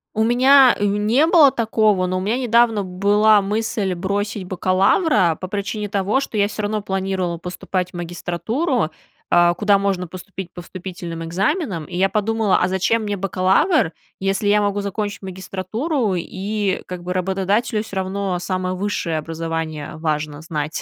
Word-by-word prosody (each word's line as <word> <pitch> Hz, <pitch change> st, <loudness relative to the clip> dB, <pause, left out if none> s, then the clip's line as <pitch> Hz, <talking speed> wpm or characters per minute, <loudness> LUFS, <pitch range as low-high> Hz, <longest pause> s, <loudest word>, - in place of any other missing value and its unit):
У 220 Hz, -, +2 dB
меня 255 Hz, +2 st, +6 dB
не 210 Hz, +8 st, +2 dB
было 320 Hz, -5 st, +6 dB
такого, 215 Hz, -5 st, +1 dB
но 185 Hz, +1 st, -1 dB
у -, -, -2 dB
меня 215 Hz, +6 st, 0 dB
недавно 235 Hz, -4 st, +3 dB
была 205 Hz, +3 st, +3 dB
мысль 205 Hz, -1 st, -1 dB
бросить 200 Hz, +3 st, -2 dB
бакалавра 185 Hz, -, +2 dB
по 185 Hz, -, -5 dB
причине 205 Hz, +1 st, -3 dB
того, 200 Hz, +4 st, 0 dB
что 275 Hz, -5 st, -5 dB
я 200 Hz, 0 st, +3 dB
всё 215 Hz, 0 st, -5 dB
равно 210 Hz, +1 st, -1 dB
планировала 190 Hz, -3 st, -2 dB
поступать 180 Hz, +1 st, -4 dB
в -, -, -46 dB
магистратуру, 175 Hz, -, -2 dB, 0.4 s
э, 175 Hz, 0 st, +5 dB
куда 205 Hz, 0 st, +3 dB
можно 195 Hz, -2 st, -1 dB
поступить 185 Hz, +1 st, -8 dB
по 175 Hz, -, -9 dB
вступительным 175 Hz, -2 st, -7 dB
экзаменам. 190 Hz, -, -1 dB
И 180 Hz, -, -8 dB
я 190 Hz, +2 st, +2 dB
подумала: 215 Hz, -1 st, +1 dB
"А 180 Hz, -, +2 dB
зачем 190 Hz, +5 st, +1 dB
мне 205 Hz, -1 st, -2 dB
бакалавр, 195 Hz, -, +2 dB, 0.3 s
если 195 Hz, +1 st, -1 dB
я 210 Hz, +1 st, +4 dB
могу 205 Hz, 0 st, 0 dB
закончить 205 Hz, +1 st, -4 dB
магистратуру?" 195 Hz, -, -2 dB
И, 195 Hz, +3 st, -2 dB
как 180 Hz, -1 st, -7 dB
бы, 180 Hz, +1 st, -3 dB
работодателю 195 Hz, +4 st, 0 dB
всё 200 Hz, -3 st, -7 dB
равно 190 Hz, -1 st, -2 dB
самое 185 Hz, 0 st, -2 dB
высшее 180 Hz, -4 st, -2 dB
образование 160 Hz, -1 st, -4 dB
важно 150 Hz, -2 st, -2 dB
знать, 155 Hz, -1 st, -4 dB
195 Hz, 155 wpm, -20 LUFS, 180-215 Hz, 0.4 s, меня